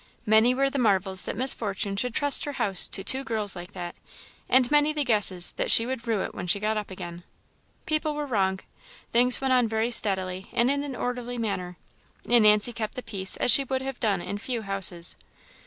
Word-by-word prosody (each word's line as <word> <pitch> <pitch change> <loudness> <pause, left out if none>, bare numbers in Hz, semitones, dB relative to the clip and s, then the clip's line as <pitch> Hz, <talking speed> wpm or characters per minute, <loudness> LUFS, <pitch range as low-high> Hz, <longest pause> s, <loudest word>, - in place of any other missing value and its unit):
Many 220 +3 +3
were 275 +1 0
the 275 - -3
marvels 190 -4 +4
that - - -5
Miss 260 +2 +3
Fortune 200 -2 -4
should 240 +4 -3
trust 285 -1 +2
her 290 - -5
house 195 -8 +3
to 195 - +2
"two 265 +6 +1
girls 215 -5 +1
like 175 +2 -10
that," 175 -2 -7 0.6
and 255 0 +2
many 295 0 +2
the 300 -1 -1
guesses 205 -7 +3
that - - -2
she 230 - +6
would 245 -1 -6
rue 220 -4 -1
it - - -7
when - - -7
she 200 +4 +1
got 215 +1 -2
up 210 -1 -5
again. 175 -2 -9 0.6
People 310 -1 -2
were 295 0 -4
wrong. 190 -7 -1 0.5
Things 245 +1 +2
went 265 -1 0
on 250 -2 +2
very 225 +2 -2
steadily, 190 -4 0
and 240 +3 +1
in 280 0 -2
an 280 -3 -7
orderly 245 0 -5
manner; 185 -6 -5 0.5
and 235 -2 +3
Nancy 210 +3 +3
kept 220 -2 -6
the 255 - -7
peace 195 -4 0
as - - +2
she 275 - +5
would 265 0 -3
have 270 -1 -7
done 200 -6 -1
in 200 - -6
few 235 0 -5
houses. 195 -3 -1
225 Hz, 215 wpm, -25 LUFS, 195-255 Hz, 0.6 s, she